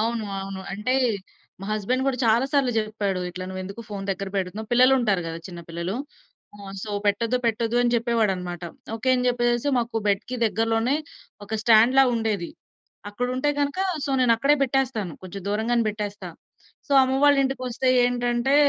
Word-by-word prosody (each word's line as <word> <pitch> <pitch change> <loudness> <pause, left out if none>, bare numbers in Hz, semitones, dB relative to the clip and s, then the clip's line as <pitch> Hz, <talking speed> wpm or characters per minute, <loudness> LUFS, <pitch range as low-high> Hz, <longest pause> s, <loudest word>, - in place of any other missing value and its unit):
అవును. 230 0 -1 0.2
అవును. 195 0 -6
అంటే 210 +6 -1 0.7
మా - - -5
హస్బెండ్ 245 +5 0
గూడా 260 -2 0
చాలా 230 +3 +4
సార్లు 275 -4 +3
జెప్పాడు. 210 -4 -1
"ఇట్లా 185 +1 -6
నువ్వేందుకు 190 +3 -6
ఫోను 200 -2 -5
దగ్గర 195 +1 -3
బెడుతున్నావు," 195 +3 -3
పిల్లలుంటారు 240 -6 +4
గదా! 165 0 -5
చిన్న 175 -1 -8
పిల్లలు. 170 +3 -4 0.6
ఆ! - - -17 0.2
సో, 215 - -6 0.2
"పెట్టొద్దు, 230 +4 +1
పెట్టొద్దు" 230 +1 0
అని 240 0 +1
జెప్పేవాడన్నమాట. 195 -7 0 0.3
ఓకే. 225 +3 -3
అని 250 0 0
జెప్పేసేసి 240 +2 +1
మాకు 235 -1 -2
బెడ్‌కి 205 +5 -1
దగ్గరలోనే 225 +5 +1 0.5
ఒక 220 +2 -3
స్టాండ్‌లా 235 +4 +6
ఉండేది. 215 -6 -1 0.6
అక్కడుంటే 250 +6 -1
గనక 285 +5 -1 0.3
సో, 280 - -3
నేనక్కడే 250 +4 +4
బెట్టేస్తాను. 250 - 0
కొంచెం 190 +1 -7
దూరంగానే 225 +3 +1
బెట్టేస్తా. 210 0 -5 0.6
సో, - - -1
అమ్మ 260 0 +1
వాళ్ళ 285 -1 +6
ఇంటికొస్తే 255 -1 -2 0.2
ఏంటంటే 245 +2 +1
225 Hz, 150 wpm, -24 LUFS, 200-250 Hz, 0.7 s, స్టాండ్‌లా